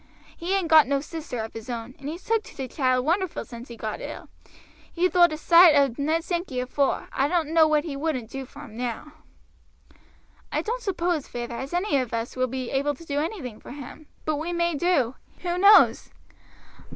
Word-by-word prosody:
He 360 +3 -1
ain't 370 -3 -1
got 315 -3 +7
no 280 0 +1
sister 310 -3 -6
of 220 - -6
his 225 +2 -9
own, 235 +1 -5
and 280 +1 -6
he's 335 +4 -7
took 455 -1 +1
to - - -13
t' 265 - -4
child 255 -2 +1
wonderful 350 +2 0
since 240 0 -10
he 235 - -10
got 215 -1 -5
ill. - - -8 0.6
He 355 +1 +2
thowt 350 -2 +5
a 310 - -3
soight 335 0 +7
o' 280 -4 +4
Ned 315 +4 0
Sankey 345 -7 -3
afore; 260 +2 0
I 270 - +2
doan't 325 -1 0
know 325 -1 +5
what 305 -1 +2
he 310 -4 -5
wouldn't 275 -6 -3
do 270 -1 -6
for 290 - -12
him 235 -7 -11
now." 245 +5 -4 1.4
"I - - -1
don't 485 +3 -3
suppose, 350 - -1
feyther, 240 0 -5
as 265 +3 -5
any 355 -3 +1
of 250 -3 -1
us 230 +1 -4
will 255 0 +1
be 255 0 -4
able 280 +2 0
to 335 - -14
do 285 -2 -1
anything 295 - -4
for - - -10
him; 290 +2 -10 0.2
but 310 -1 0
we 320 +4 -3
may 340 0 0
do, 290 -6 +1 0.3
who 350 0 -1
knows?" 405 +2 +6
295 Hz, 210 wpm, -25 LUFS, 255-340 Hz, 1.4 s, got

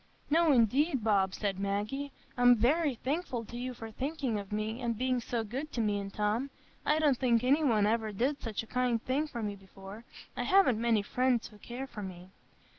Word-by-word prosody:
"No, 325 0 +5
indeed, 260 +2 +3
Bob," 195 -3 +2
said 195 -3 -2
Maggie, 210 +9 -2 0.2
"I'm 245 0 +6
very 280 +5 +2
thankful 260 -2 -3
to 235 - -10
you 250 +1 -4
for 225 -1 -8
thinking 265 -3 -2
of 200 0 -9
me, 215 +3 -2
and 235 -2 -1
being 255 +1 +1
so 235 -1 -2
good 265 +8 -5
to - - -3
me 210 -2 +1
and 195 0 -6
Tom. 215 +7 -1 0.4
I 300 - +4
don't 295 -5 +3
think 240 -3 +3
any 280 +5 +3
one 220 -7 +3
ever 220 0 0
did 265 +8 -1
such 225 -2 -3
a - - -11
kind 250 0 0
thing 280 +4 0
for 235 -6 -5
me 205 -1 -3
before. 195 +2 -12 0.3
I - - -2
haven't 370 - +4
many 230 -3 +2
friends 250 +1 +1
who 210 - -17
care 245 +5 -6
for 225 -5 -8
me." 185 -1 -8
235 Hz, 205 wpm, -31 LUFS, 210-265 Hz, 0.4 s, I'm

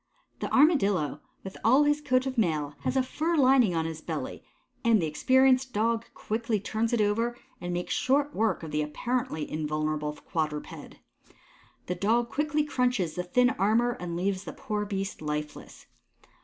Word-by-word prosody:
The - - -4
Armadillo, 200 - +3 0.2
with 190 - -8
all 260 +6 +5
his 295 0 +2
coat 255 -2 +1
of 265 -1 -3
mail, 155 - 0
has 265 - -1
a 260 - +3
fur 320 +6 -1
lining 255 - +4
on 160 -1 0
his 160 -1 -5
belly, - - -5 0.4
and 230 -3 +4
the 165 - 0
experienced 260 - +3
Dog 230 +2 +1
quickly 220 0 -2
turns 220 +3 -1
it 235 -2 +2
over 230 +4 0 0.2
and 175 0 -4
makes 175 +1 -2
short 280 +5 +1
work 220 -5 0
of 160 - -6
the 150 - 0
apparently 160 +1 -2
invulnerable 155 0 -2
quadruped. 150 -1 -5 0.9
The 180 - -2
Dog 225 +6 +1
quickly 300 +1 0
crunches 250 - 0
the 180 - -2
thin 245 +8 +3
armour 225 +5 +2
and 170 -1 -4
leaves 190 +1 -1
the - - -6
poor 210 -1 -3
beast 195 -2 -4
lifeless. 150 0 -5
215 Hz, 165 wpm, -28 LUFS, 165-255 Hz, 0.9 s, all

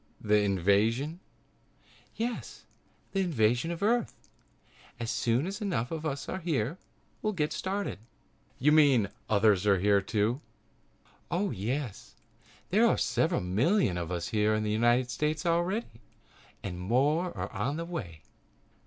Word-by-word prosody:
"The 105 0 +3
invasion?" 105 - +1 1.0
"Yes, 235 +1 -4 0.5
the 195 - -1
invasion 125 - +1
of 170 +3 -4
Earth. 235 +3 +1 0.8
As 115 -1 -2
soon 120 +5 +1
as 195 +4 -5
enough 170 - -1
of 160 -1 -3
us 140 -2 -4
are 185 - -3
here 155 - -1 0.4
we'll 215 - 0
get 150 -5 -1
started." 195 - -3 0.6
"You 150 +4 +3
mean 145 -7 +5
there 100 - -6 0.2
are 110 - +2
others 100 -2 +4
here, 100 0 +4
too?" 110 +6 0 0.9
"Oh, 190 +3 0
yes, 120 +3 -4 0.6
there - - +5
are - - +2
several - - +1
million 105 - +2
of 85 -1 -3
us 85 -1 -3
here 110 0 +2
in 110 - -1
the 105 - -1
United 120 +3 +2
States 150 +4 -1
already 175 +6 +1 0.8
and 90 -3 -5
more 140 - +2
are - - -4
on 130 +10 -2
the 165 - -3
way." 95 - -6
125 Hz, 145 wpm, -29 LUFS, 105-170 Hz, 1.0 s, mean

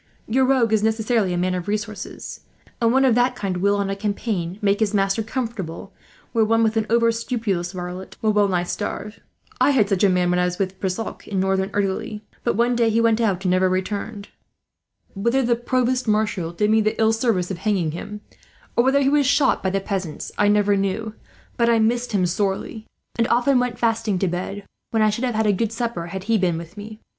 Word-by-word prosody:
Your 260 +4 +2
rogue 255 -4 +2
is 215 - +3
necessarily 220 -2 +1
a 175 - -1
man 180 +1 0
of 180 0 -4
resources; 210 0 -5 0.4
and 230 -1 +4
one 265 +2 +4
of 255 - +4
that 245 +2 +2
kind 190 -5 -3
will, 200 +3 +2
on 200 -1 -1
a - - -2
campaign, 200 -3 -3
make 200 -1 +1
his 215 -1 +1
master 195 +2 +1
comfortable, 225 -7 -5 0.4
where 225 -2 +3
one 225 +1 +3
with 220 0 +1
an 220 -1 0
over 230 0 +4
scrupulous 225 -7 -2
varlet 180 0 -7
will 215 -1 +1
well 205 -1 +3
nigh 180 -2 0
starve. 210 +4 -5 0.4
I - - +4
had 250 -8 +3
such 195 -2 +1
a 200 - +6
man, 180 -1 +2
when 180 - +2
I 180 - +2
was 180 0 -2
with 190 -1 -3
Brissac 195 +4 -4
in 195 -2 -2
Northern 190 0 +1
Italy; 205 +1 -2 0.2
but - - 0
one 240 +2 +2
day 235 -1 +3
he 225 +1 +2
went 230 0 +3
out, 195 -4 0
and 180 - +2
never 185 0 +3
returned. 200 +3 -3 0.8
Whether 235 +7 +1
a 240 -1 +2
provost 250 +1 0
marshal 210 -6 0
did 210 +5 0
me 220 0 +4
the 215 0 -1
ill 220 0 +4
service 225 -6 0
of 180 - -5
hanging 190 -7 0
him, 205 +6 -7 0.5
or 235 - +4
whether 270 +2 +3
he 270 - +3
was 285 -1 +3
shot 275 -1 +3
by 190 - 0
the 195 +1 0
peasants, 190 -5 -4
I 205 - +2
never 205 0 +3
knew; 200 +3 -2 0.4
but 235 -1 +3
I 230 - +4
missed 235 +2 +1
him 195 -4 +2
sorely, 195 +4 -2 0.3
and 230 - +3
often 250 +2 +3
went 245 -1 -1
fasting 225 -3 0
to 190 - 0
bed, 185 +3 -4 0.3
when 225 -1 +2
I 215 - +4
should 235 +5 -2
have 245 -3 -2
had 220 0 +1
a 210 - +3
good 220 +3 -1
supper 230 -7 -3
had 190 +2 -6
he 225 +1 +1
been 175 -3 +1
with 170 +2 -9
me. 215 +1 -9
210 Hz, 225 wpm, -22 LUFS, 190-230 Hz, 0.8 s, a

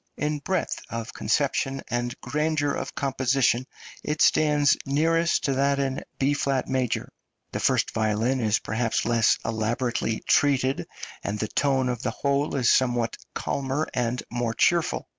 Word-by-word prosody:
In 150 0 -1
breadth 185 +3 -2
of 115 0 -5
conception 135 -1 0
and 120 0 -3
grandeur 150 -1 0
of - - -5
composition, 130 -2 +1 0.4
it 150 +1 -2
stands 150 -2 +4
nearest 165 +4 +1
to 140 - +1
that 140 +1 +2
in 135 -1 -2
B 140 +2 +2
flat 135 -2 0
major; 130 -3 -1 0.4
the - - -3
first - - +2
violin 110 +4 0
is 110 -2 +2
perhaps 115 +1 -1
less 115 -1 +3
elaborately 115 0 -1
treated, 135 -2 +2 0.4
and 100 +1 -2
the 110 - -2
tone 135 -2 +1
of 125 -1 -2
the - - -1
whole 140 +1 -1
is 125 -4 +3
somewhat 120 -3 +1 0.2
calmer 140 +3 -2
and 120 0 -1
more 120 -1 -2
cheerful. 170 -2 +2
135 Hz, 145 wpm, -25 LUFS, 120-145 Hz, 0.4 s, stands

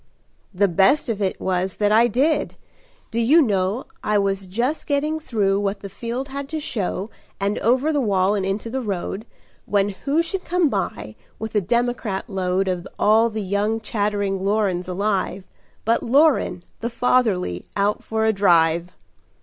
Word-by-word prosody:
"The 200 +1 +2
best 195 - +3
of 215 -2 -2
it 190 -2 -1
was 185 0 -1
that 205 0 +1
I 230 +3 +5
did. 275 +8 +1 0.6
Do 230 - -1
you 265 +9 +5
know, 205 - +1 0.2
I 210 0 +2
was 195 -1 0
just 240 +11 -2
getting 300 +2 0
through 205 -9 0
what 205 0 -2
the 200 - -7
field 235 +7 -5
had 280 0 -5
to 315 - -3
show 210 - -3 0.3
And 200 +1 -1
over 260 +7 +2
the 290 - +1
wall 195 -3 +2
and 200 -2 -1
into 195 +4 -2
the 265 +1 -2
road, 200 0 -4 0.4
When 200 -1 +2
who 280 - 0
should 370 +2 -4
come 350 -3 +2
by, 110 - -3 0.2
with 220 0 -6
a 210 - +2
democrat 235 -1 -1
load 190 0 0
Of 180 -1 -2
all 220 +2 +4
the 215 -1 -4
young 205 +3 0
chattering 205 -2 -1
Lorens 195 -3 0
alive, 190 0 -1 0.4
But 230 +2 +2
Loren, 275 - +3 0.2
the 235 - -2
fatherly, 225 - +1
out 200 +1 +1
for 220 0 -1
a 220 - +3
drive." 170 -3 +3
210 Hz, 165 wpm, -22 LUFS, 195-240 Hz, 0.6 s, I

